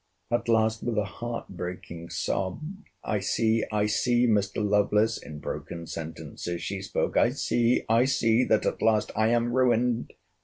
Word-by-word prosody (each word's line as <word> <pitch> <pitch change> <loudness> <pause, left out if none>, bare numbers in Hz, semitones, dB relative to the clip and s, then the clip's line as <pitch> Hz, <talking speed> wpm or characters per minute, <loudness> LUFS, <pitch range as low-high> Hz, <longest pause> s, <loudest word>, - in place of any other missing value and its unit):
At 120 0 0
last, 110 -1 +2
with 120 -2 -2
a 105 - +3
heart 115 +4 -6
breaking 90 -2 -7
sob, 90 +3 -2 0.4
I 105 - -1
see, 110 +3 +1
I 105 -1 +1
see, 120 +3 +2
Mr. 105 -2 +1
Lovelace, 105 +2 +2
in 75 - -9
broken 85 +2 -6
sentences 85 +2 -6
she 100 -1 -3
spoke—I 95 - +1
see, 120 +1 +1
I 115 +3 +4
see—that 115 -3 +2
at - - -1
last—I 110 0 +2
am 120 +1 +1
ruined! 120 -1 +2
110 Hz, 145 wpm, -27 LUFS, 95-115 Hz, 0.4 s, I